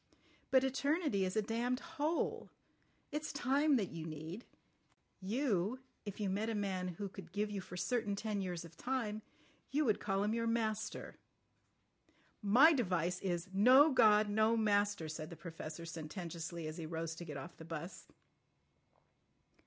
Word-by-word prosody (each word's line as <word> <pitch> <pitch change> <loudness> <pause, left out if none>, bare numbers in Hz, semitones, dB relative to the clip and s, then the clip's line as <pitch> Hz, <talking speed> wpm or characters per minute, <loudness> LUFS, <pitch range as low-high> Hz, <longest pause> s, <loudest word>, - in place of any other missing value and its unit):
But 260 -1 +5
eternity 275 - +1
is 185 - -2
a 215 - +3
damned 240 +4 0 0.2
hole. 315 +3 0 0.6
It's 300 +1 -3
time 285 +2 +3
that 205 -7 0
you 165 -1 -5
need. 160 +7 -7 0.8
You—if 220 0 -2
you 205 - 0
met 205 +4 0
a 225 - -1
man 190 -3 -1
who 180 +3 -4
could 190 -3 -10
give 210 +2 -1
you 200 -2 -3
for 180 0 -9
certain 220 +1 0
ten 210 -1 -2
years 175 -3 -4
of 165 0 -13
time, 225 -1 -2 0.5
you 295 +2 +1
would 215 -4 +2
call 195 -1 0
him 210 +1 +1
your 230 0 0
master." 220 -2 -2 1.2
"My 250 +11 +7
device 180 - 0
is: 175 -1 -2
No 255 +10 +7
God! 215 -4 +6
No 220 +2 +3
Master," 205 -5 +2
said 155 0 -5
the 170 - -8
Professor 165 -1 -7
sententiously 165 0 -5
as 155 +2 -5
he 165 -2 -5
rose 165 0 -3
to 170 - -8
get 150 -3 -6
off 170 +6 -8
the 160 - -10
'bus. 165 +2 -7
205 Hz, 155 wpm, -36 LUFS, 170-230 Hz, 1.2 s, My